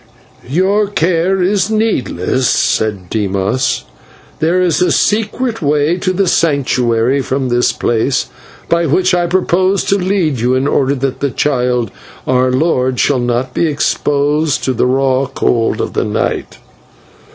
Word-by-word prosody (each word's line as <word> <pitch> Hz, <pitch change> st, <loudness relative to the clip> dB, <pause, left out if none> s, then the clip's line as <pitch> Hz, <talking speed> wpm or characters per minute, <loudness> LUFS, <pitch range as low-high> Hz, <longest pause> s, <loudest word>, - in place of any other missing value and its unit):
"Your 195 Hz, +7 st, +1 dB
care 180 Hz, 0 st, 0 dB
is 195 Hz, +1 st, +1 dB
needless," 130 Hz, -, 0 dB
said 105 Hz, -4 st, 0 dB
Dimas. 100 Hz, +4 st, -1 dB, 0.6 s
"There 170 Hz, +4 st, +1 dB
is 180 Hz, -3 st, +1 dB
a 180 Hz, -, +2 dB
secret 225 Hz, +3 st, 0 dB
way 150 Hz, +3 st, +1 dB
to 185 Hz, 0 st, -1 dB
the 195 Hz, +1 st, 0 dB
Sanctuary 130 Hz, -5 st, +1 dB
from 130 Hz, 0 st, -2 dB
this 120 Hz, 0 st, +2 dB
place, 120 Hz, +3 st, 0 dB, 0.4 s
by 170 Hz, 0 st, +1 dB
which 185 Hz, +6 st, +2 dB
I 175 Hz, -1 st, +1 dB
propose 185 Hz, +2 st, +1 dB
to 200 Hz, -, +1 dB
lead 180 Hz, -, 0 dB
you 125 Hz, +3 st, +1 dB
in 130 Hz, +2 st, 0 dB
order 140 Hz, -1 st, +1 dB
that 135 Hz, 0 st, -3 dB
the 140 Hz, -, 0 dB
child, 125 Hz, -4 st, 0 dB, 0.3 s
our 130 Hz, 0 st, +2 dB
lord, 130 Hz, -3 st, 0 dB
shall 140 Hz, -3 st, +2 dB
not 120 Hz, +1 st, -1 dB
be 170 Hz, -, +1 dB
exposed 145 Hz, 0 st, 0 dB
to 130 Hz, -, 0 dB
the 125 Hz, -, +1 dB
raw 135 Hz, +1 st, +1 dB
cold 115 Hz, -3 st, 0 dB
of -, -, -3 dB
the -, -, 0 dB
night." -, -, -2 dB
140 Hz, 145 wpm, -14 LUFS, 125-180 Hz, 0.6 s, a